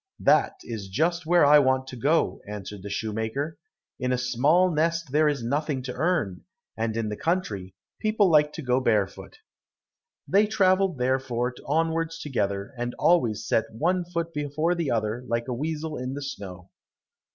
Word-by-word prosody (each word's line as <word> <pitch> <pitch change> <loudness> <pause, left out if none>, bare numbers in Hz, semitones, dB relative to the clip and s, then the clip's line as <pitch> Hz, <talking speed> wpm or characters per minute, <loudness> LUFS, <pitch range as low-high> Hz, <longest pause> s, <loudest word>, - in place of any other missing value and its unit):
"That - - +4
is 105 -4 -6
just 165 - 0
where 175 -2 +5
I 150 +1 +8
want 130 -1 +2
to 130 - -7
go," 145 +7 +1
answered 105 -1 -7
the 100 - -7
shoemaker. 110 +9 -3 0.4
"In 125 0 -1
a 125 - +2
small 140 +9 +3
nest 165 -1 0
there 150 +2 +4
is 140 -5 -2
nothing 140 +2 -1
to 125 -1 -5
earn, 155 - 0 0.3
and 110 0 -2
in 110 -2 -1
the 105 - -3
country, 105 - -2 0.2
people 215 -2 +2
like 150 -3 +4
to 160 - -6
go 125 0 +2
barefoot." 105 -6 -1 0.9
They 205 +2 +4
travelled 190 -5 +2
therefore 125 -1 0
onwards 165 +2 0
together, 100 -8 -2
and 120 0 -3
always 120 - +2
set 110 - +2
one 175 +10 0
foot 170 -1 -4
before 150 +3 0
the 170 -5 -2
other 110 +1 -1
like 115 +1 -1
a 125 - -2
weasel 155 +3 -3
in 130 +1 -4
the 145 - -5
snow. 95 -8 -8
140 Hz, 165 wpm, -26 LUFS, 115-165 Hz, 0.9 s, I